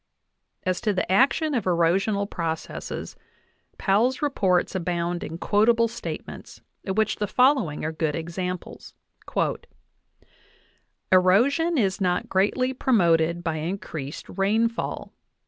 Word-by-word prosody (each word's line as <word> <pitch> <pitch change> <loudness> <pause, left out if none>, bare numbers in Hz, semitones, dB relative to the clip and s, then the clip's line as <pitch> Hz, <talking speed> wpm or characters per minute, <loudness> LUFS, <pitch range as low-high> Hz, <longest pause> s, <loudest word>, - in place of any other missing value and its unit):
As 185 -1 -1
to 215 -3 +1
the 185 -1 -2
action 280 - +3
of 235 -7 -1
erosional 190 +4 +1
processes, 165 -4 -5 0.6
Powell's 225 +7 +2
reports 190 -11 +1
abound 175 -1 -2
in 160 +2 -6
quotable 225 +6 +3
statements, 230 - -8 0.3
of 190 +1 -2
which 215 -1 +1
the 210 - -1
following 250 - +2
are 160 - -1
good 155 -2 -1
examples: 180 +2 -5 2.2
"Erosion 245 - +4
is 195 -4 0
not 180 -1 0
greatly 235 +7 +1
promoted 170 -9 +2
by 165 -2 -1
increased 155 -4 -5
rainfall. 220 +4 -1
190 Hz, 110 wpm, -25 LUFS, 170-230 Hz, 2.2 s, Erosion